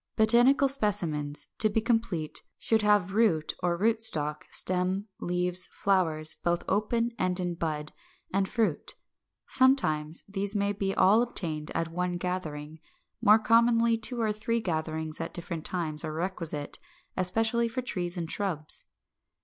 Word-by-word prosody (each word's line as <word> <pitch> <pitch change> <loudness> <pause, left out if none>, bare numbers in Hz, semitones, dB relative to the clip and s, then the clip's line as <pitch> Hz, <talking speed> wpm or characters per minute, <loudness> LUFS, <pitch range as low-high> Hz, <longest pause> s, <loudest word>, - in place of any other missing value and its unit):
557. 235 +3 +5
=Botanical 275 0 +4
Specimens=, 170 - 0
to 215 - +5
be 215 - +1
complete, 220 -9 -1 0.2
should 225 -1 +1
have 205 -3 +2
root 190 -9 +2
or 175 -1 0
rootstock, 185 -8 +3
stem, 185 +2 0
leaves, 180 +1 -1
flowers, 160 -6 +2
both 175 0 0
open 230 +4 0
and 185 0 0
in 175 -1 -2
bud, 155 -3 -3 0.4
and 195 0 +1
fruit. 215 -10 -1 0.5
Sometimes 165 - +2
these 200 +1 0
may 200 0 +1 0.3
all 215 +5 +5
be 245 - -5
obtained 155 -8 -1
at 165 0 -1
one 180 +1 -2
gathering; 160 -4 -5 0.4
more 210 +1 +6
commonly 230 +1 +3
two 230 +2 -1
or 220 -2 0
three 230 +2 -1
gatherings 160 -4 -3
at 165 - -6
different 170 -2 -5
times 160 -4 -1
are 155 -1 -4
requisite, 165 -3 -3 0.4
especially 225 +5 +1
for 255 +2 -4
trees 180 -7 -3
and 165 -2 -4
shrubs. 170 -7 -3
185 Hz, 140 wpm, -28 LUFS, 160-220 Hz, 0.5 s, more